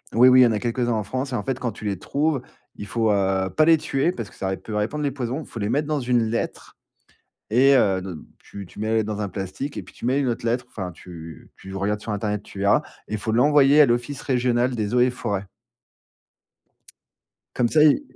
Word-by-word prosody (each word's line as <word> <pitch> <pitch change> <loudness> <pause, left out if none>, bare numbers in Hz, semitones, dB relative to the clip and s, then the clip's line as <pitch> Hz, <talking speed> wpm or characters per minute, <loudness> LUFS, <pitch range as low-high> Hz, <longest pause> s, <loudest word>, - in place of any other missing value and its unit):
oui, 125 +3 +7
oui, 130 0 +7
il - - +9
y - - +6
en - - +1
a - - 0
quelques-uns 120 +2 -1
en 110 - -1
France 130 +5 -4
et - - 0
en 105 - -2
fait, 130 +2 -3
quand 125 -2 -2
tu 110 - -10
les 100 -3 -2
trouves, 145 +2 0 0.4
il 105 - -7
faut, 110 0 +1
heu, 95 -1 +1
pas 155 - +5
les 165 0 +6
tuer 145 +3 0
parce 115 - -6
que - - -18
ça 95 - -4
ré 95 0 -2
peut 110 - -9
répandre 115 +9 -1
les 140 - 0
poisons, 130 +2 -3
il - - -10
faut 115 - -8
les 100 0 -1
mettre 145 +5 0
dans 150 -2 0
une 120 -2 +1
lettre 115 - -4 0.7
et 135 +5 +5
heu, 95 -7 +3
ne 95 0 -6 0.3
tu 100 -2 -10
tu - - -14
mets 110 +1 -2
la 110 - +1
lettre 110 -1 0
dans 105 -1 -3
un 100 - -2
plastique 100 +9 -5
et - - -3
puis - - -17
tu - - -8
mets 130 +3 +2
une 140 - 0
autre 120 -1 -2
lettre, 120 +1 0
enfin, 95 -4 -5
tu 85 -3 -11
tu 95 0 -10
regardes 105 +2 -1
sur 110 - -5
Internet, 105 0 -2
tu 100 - -11
verras, 100 +9 +3 0.2
il 110 - -3
faut 110 +1 -3
l'envoyer 145 +4 +5
à - - +8
l'Office 120 +3 -1
Régional 125 -1 +1
des 105 -1 -2
eaux 125 - +3
et 125 - +5
Forêts. 100 -5 -3 2.1
Comme 120 -1 +2
ça, 155 +3 +4
ils 155 - +5
120 Hz, 250 wpm, -23 LUFS, 105-130 Hz, 2.1 s, il